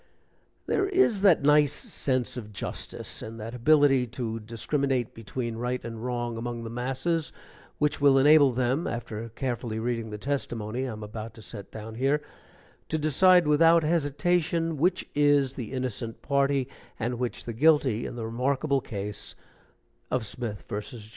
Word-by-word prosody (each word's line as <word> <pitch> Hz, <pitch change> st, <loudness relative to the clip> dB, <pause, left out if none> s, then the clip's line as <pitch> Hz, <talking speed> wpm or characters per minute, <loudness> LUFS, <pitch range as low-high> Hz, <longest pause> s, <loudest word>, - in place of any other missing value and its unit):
There 390 Hz, -1 st, +1 dB
is 360 Hz, -, +3 dB
that 185 Hz, -8 st, +5 dB
nice 150 Hz, 0 st, +5 dB
sense 130 Hz, -5 st, -2 dB
of 110 Hz, -4 st, -7 dB
justice 100 Hz, -, -6 dB
and 115 Hz, +1 st, -7 dB
that 110 Hz, +2 st, -6 dB
ability 135 Hz, 0 st, +4 dB
to 115 Hz, -3 st, -2 dB
discriminate 125 Hz, +3 st, -1 dB
between 115 Hz, +1 st, -5 dB
right 125 Hz, +2 st, -1 dB
and 115 Hz, -1 st, -6 dB
wrong, 120 Hz, -2 st, -2 dB
among 120 Hz, 0 st, -4 dB
the 115 Hz, -, -6 dB
masses, 135 Hz, +7 st, -1 dB, 0.5 s
which 150 Hz, -1 st, 0 dB
will 140 Hz, -1 st, +6 dB
enable 145 Hz, 0 st, +6 dB
them, 130 Hz, +5 st, 0 dB
after 115 Hz, -1 st, -5 dB
carefully 120 Hz, -2 st, -3 dB
reading 115 Hz, -1 st, -2 dB
the 105 Hz, -, -5 dB
testimony 120 Hz, -1 st, -3 dB
I -, -, -4 dB
am 105 Hz, 0 st, -8 dB
about 110 Hz, +1 st, -7 dB
to 110 Hz, -, -12 dB
set 100 Hz, -2 st, -8 dB
down 110 Hz, 0 st, -8 dB
here, 135 Hz, +5 st, +1 dB, 0.7 s
to 160 Hz, -, 0 dB
decide 175 Hz, +4 st, +5 dB
without 165 Hz, +2 st, +5 dB
hesitation 165 Hz, +1 st, +1 dB
which 180 Hz, +5 st, +1 dB
is 145 Hz, -2 st, +3 dB
the 120 Hz, -6 st, -6 dB
innocent 125 Hz, -3 st, -4 dB
party 140 Hz, -1 st, +1 dB, 0.3 s
and 120 Hz, +1 st, -2 dB
which 125 Hz, -1 st, -3 dB
the 115 Hz, -, -4 dB
guilty 135 Hz, -3 st, +3 dB
in -, -, -7 dB
the 115 Hz, -2 st, -4 dB
remarkable 135 Hz, +4 st, 0 dB
case 105 Hz, -1 st, -5 dB, 0.7 s
of 125 Hz, -3 st, 0 dB
Smith 105 Hz, 0 st, -6 dB
vs. 105 Hz, +1 st, -6 dB
125 Hz, 155 wpm, -27 LUFS, 115-145 Hz, 0.7 s, will